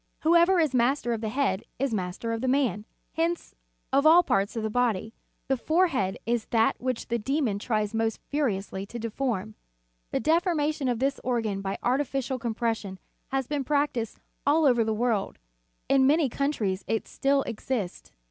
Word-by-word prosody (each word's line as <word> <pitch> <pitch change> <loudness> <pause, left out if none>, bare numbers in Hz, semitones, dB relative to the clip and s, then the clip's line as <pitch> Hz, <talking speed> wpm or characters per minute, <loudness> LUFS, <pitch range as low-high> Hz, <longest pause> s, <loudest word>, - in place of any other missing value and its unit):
Whoever 340 +3 +5
is 310 -5 +2
master 245 0 +2
of 225 - -3
the 220 - -2
head 215 -6 0
is 270 -2 -1
master 190 +3 -3
of 225 - -3
the 260 - -1
man. 250 -7 +1 0.3
Hence, 335 +1 -1 0.4
of 275 +1 +4
all 330 +3 +7
parts 200 - 0
of 225 - -2
the - - -1
human 245 +3 +3
body, 220 0 -3 0.3
the 270 - +2
forehead 295 - +1
is 235 -1 0
that 225 -1 +2
which 255 -1 -3
the 235 0 0
demon 255 -3 0
tries 215 -1 -1
most 225 0 0
furiously 200 -9 -1
to 240 - -7
deform. 225 -2 -2 0.6
The - - -1
deformation 310 - +1
of 245 -2 +1
this 275 +3 0
organ 225 -6 -1
by 195 0 -3
artificial 260 0 0
compression 225 -4 -2 0.3
has 270 -1 -1
been 290 +1 -2
practised 285 -5 0 0.3
all 310 +2 +3
over 245 -4 +4
the 220 - -1
world; 220 -2 0 0.5
in 270 -1 +4
many 300 -1 +3
coun 280 +4 0
tries 195 -8 -2
it 225 - -1
still 275 0 +1
exists. 220 -4 -4
245 Hz, 175 wpm, -27 LUFS, 220-280 Hz, 0.6 s, all